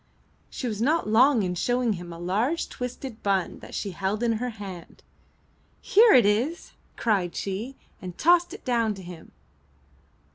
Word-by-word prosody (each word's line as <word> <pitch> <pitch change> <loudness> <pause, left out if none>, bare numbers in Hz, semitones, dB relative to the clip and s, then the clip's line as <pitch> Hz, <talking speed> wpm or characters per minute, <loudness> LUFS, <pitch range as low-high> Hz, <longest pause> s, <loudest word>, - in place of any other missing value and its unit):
She 255 - -5
was 215 -2 -3
not 305 +4 +1
long 235 +2 +4
in 180 -1 -1
showing 245 +5 0
him 175 -2 -8
a 170 - -8
large 210 - -1
twisted 250 -1 -7
bun 195 -3 -1
that - - -10
she 200 - -3
held 195 +5 -2
in 230 -1 +2
her 250 - -1
hand. 195 -6 -10 0.8
"Here 445 +2 +5
it 245 -5 +6
is!" 240 - 0 0.3
cried 195 -6 0
she, 210 +7 -4 0.3
and 180 -2 -8
tossed 350 +1 +4
it 400 - -10
down 230 -4 +1
to 190 - -10
him. 175 -2 -11
220 Hz, 160 wpm, -26 LUFS, 190-255 Hz, 0.8 s, it